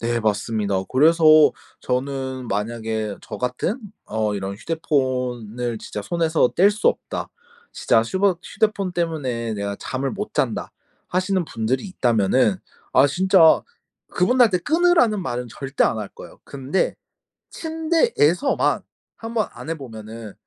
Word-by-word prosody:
네. 120 0 -1
맞습니다. 105 -1 -1
그래서 160 +5 +4 0.6
저는 130 -1 -3
만약에 110 0 -3
저 110 -5 -8
같은 125 - -2 0.2
어 105 -1 -1
이런 100 0 -4
"휴대폰을 125 -5 -2
진짜 105 - -6
손에서 160 +1 +1
뗄 195 +3 +5
수 210 0 +1
없다. - - -3 0.4
진짜 115 -1 +2
휴버 190 - +1
휴대폰 200 -3 -1
때문에 130 -10 -2
내가 100 0 -3
잠을 135 +1 -3
못 - - -6
잔다." - - -1 0.4
하시는 185 0 0
분들이 120 - -2
있다면은. 115 - +2 0.3
아 130 +2 +6
진짜 180 +1 +5 0.5
그분들한테 215 0 +3
"끊으라."는 315 - +3
말은 125 -2 -4
절대 135 +4 -1
안 110 - 0
할 105 - -5
거예요. - - -13
근데 140 +6 -1 0.6
침대에서만 320 - +1 0.3
한번 225 -1 -2
안 160 - -9
해보면은 115 -7 -7
130 Hz, 275 characters per minute, -22 LUFS, 115-185 Hz, 0.6 s, 아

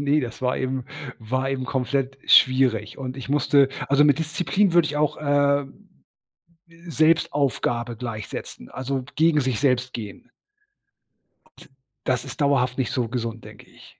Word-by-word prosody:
Ne, 145 +1 +2
das 120 -4 -6
war 125 0 +1
eben 130 -1 -2 0.3
war 130 +4 -2
eben 130 -1 -2
komplett 130 +1 -2
schwierig 130 -6 +4
und 130 -1 -5
ich 135 - -8
musste 140 -1 +3 0.2
also 140 +1 +5
mit 145 -2 +4
Disziplin 180 +4 0
würde 170 -2 +4
ich 150 - -4
auch, 150 0 +1
äh, 145 -1 +2 1.2
Selbstaufgabe 140 -6 +1
gleichsetzen, 110 - -7
also, 130 0 -3
gegen 160 -1 +4
sich 130 -4 -1
selbst 125 -2 +1
gehen. 105 -5 -8 1.2
Und, - - -18 0.4
das 130 -1 -1
ist - - -7
dauerhaft 130 -3 +2
nicht 130 -4 -1
so 125 -2 -1
gesund, 115 -2 -4
denke - - -14
ich. - - -18
130 Hz, 145 wpm, -23 LUFS, 125-145 Hz, 1.2 s, also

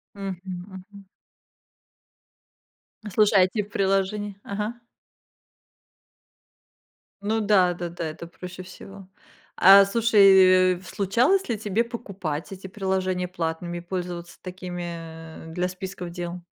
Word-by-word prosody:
Мгм, 195 -3 -5 0.3
мгм. 200 +1 -12 2.0
Ну, 210 - -6
слушай, 210 0 +4
а - - +7
этих 205 +2 -2
приложений 195 +1 0
ага. 210 +3 -3 2.5
Ну 220 +2 0
да, 195 -4 +4
да-да, 175 -1 -5
это 160 +1 -6
проще 180 +2 -9
всего. 195 +1 -12 0.5
А 195 +1 +8
слушай, 195 -4 +5
э, - - -12
случалось 235 - +1
ли 235 - 0
тебе 215 +2 0
покупать 195 - -5
эти 195 0 -8
приложения 185 -2 -2
платными 170 0 -4
и - - -6
пользоваться 175 -1 -6
такими 170 -3 -8
для 180 +1 0
списков 185 -1 -7
дел? 175 0 -6
185 Hz, 110 wpm, -25 LUFS, 175-200 Hz, 2.5 s, А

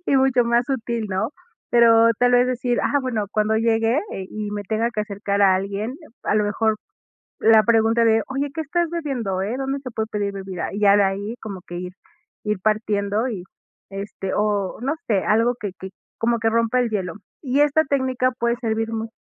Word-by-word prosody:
y 275 - +3
mucho 265 -2 +4
más 235 +1 +2
útil, 235 -3 -2
¿no? 190 +4 -1 0.4
Pero 230 -1 +6
tal 245 0 +3
vez 245 0 +5
decir: 245 -1 -1
''Ah, 285 - +2
bueno, 225 -5 -2
cuando 215 +1 +1
llegue 225 +2 +2 0.2
eh, 190 - -5
y 210 -1 -4
me 205 0 -3
tenga 220 +4 0
que 215 - -2
acercar 200 0 -2
a 190 -1 +6
alguien'', 200 +7 -3 0.3
a - - +1
lo 210 -1 +3
mejor 215 +1 +1 0.6
la 220 -1 +6
pregunta 230 +1 +3
de: 225 0 +4
''Oye, 275 +2 -2
¿qué 320 - -3
estás 340 +3 -1
bebiendo, 250 - -2
eh? 215 +6 -2
¿Dónde 270 +1 -2
se 255 - -6
puede 220 0 -2
pedir 205 -1 -2
bebida?". 190 -3 -5
Y 205 - -3
ya 200 0 +6
de 200 - +5
ahí 200 +4 -2
como 195 -4 -7
que 175 - -8
ir 180 0 -6 0.5
ir 210 -2 -1
partiendo 215 +1 0
y, 190 -6 -5 0.5
este 195 -1 -5
o 205 -2 0
no 275 +4 0
sé 200 -4 +1
algo 230 +3 +3
que 205 -3 -4
que 190 - -7 0.3
como 235 +1 +2
que 225 0 +2
rompa 230 +2 +2
el 240 -2 +1
hielo. 185 -5 -2 0.3
Y 275 0 +1
esta 295 +2 +4
técnica 260 -2 +1
puede 235 0 +1
servir, 225 -1 -2
muy 225 0 -3
225 Hz, 205 wpm, -22 LUFS, 205-245 Hz, 0.6 s, Pero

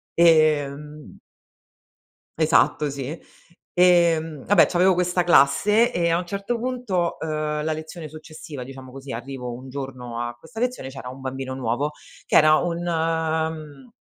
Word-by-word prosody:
ehm 150 -3 +2 1.2
esatto, 155 -1 +3
sì. 140 +4 -5 0.5
Ehm, 170 -5 +3
ah 205 - +3
beh, 185 - +7
c'avevo 185 +1 +3
questa 180 0 +1
classe 200 - +4
e 170 -1 +1
a 170 - +2
un 180 - -5
certo, 200 +5 -3
punto, 240 -9 -2
uhm, 155 -1 -2
la 155 0 0
lezione 155 +1 -7
successiva 155 -3 -9
diciamo 130 0 -11
così, 135 0 -9
arrivo 125 0 -6
un 130 +2 -10
giorno 130 -3 -6
a 120 0 -4
questa 165 - -11
lezione 250 - -2
e - - -11
c'era 130 -2 -8
un 130 +1 -10
bambino 130 0 -5
nuovo. 135 +4 -2 0.3
Che - - 0
era 155 0 +7
un, 175 0 -2
mhmm, 160 - -2
155 Hz, 150 wpm, -23 LUFS, 135-175 Hz, 1.2 s, beh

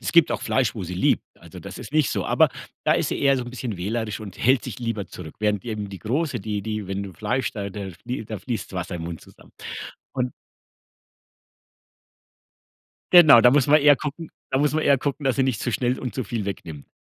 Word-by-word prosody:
es - - -3
gibt 170 -2 +6
auch - - -2
Fleisch, 125 -6 +1
wo 100 - -4
sie 90 +1 -5
liebt, 90 - +2 0.2
also - - -12
das - - -8
ist - - -9
nicht 155 -5 +3
so. - - -1
Aber - - +4 0.4
da - - +4
ist - - +1
sie - - -2
eher 140 -1 +4
so 130 - -2
'n 120 - -8
bisschen 120 -5 -5
wählerisch 105 +4 -2
und 100 -4 -9
hält 130 +1 +3
sich - - -6
lieber 115 -4 -3
zurück, 80 -4 -10
während 105 -1 0
eben 105 -3 -4
die 95 - -7
Große, 140 - -1
die 105 0 -3
die 110 -2 -3
wenn 95 +1 -3
du 95 -2 -7
Fleisch 125 +9 -1
da 100 -6 -4
da 100 0 -6
flie 110 +7 -6
da 110 -1 -6
fließt 120 -2 -5
das 95 - -5
Wasser 90 0 -3
im 85 - -5
Mund 85 -2 -6
zusammen. - - -18 0.6
Und 125 -1 -1 2.8
Genau, 155 -9 +10
da 125 - +7
muss 140 0 +4
man 150 +2 +6
eher 145 0 +7
gucken 150 +4 -6 0.2
da 130 - +3
muss 145 0 +2
man 155 - +1
eher 140 -2 +4
gucken, 145 +2 -3
dass 135 -2 +2
sie 135 - +3
nicht 130 -5 -1
zu 120 - -1
schnell 125 +2 0
und 125 - -4
zu 130 -3 -2
viel 110 +1 -3
wegnimmt. 80 -7 -6
115 Hz, 235 wpm, -24 LUFS, 100-135 Hz, 2.8 s, Genau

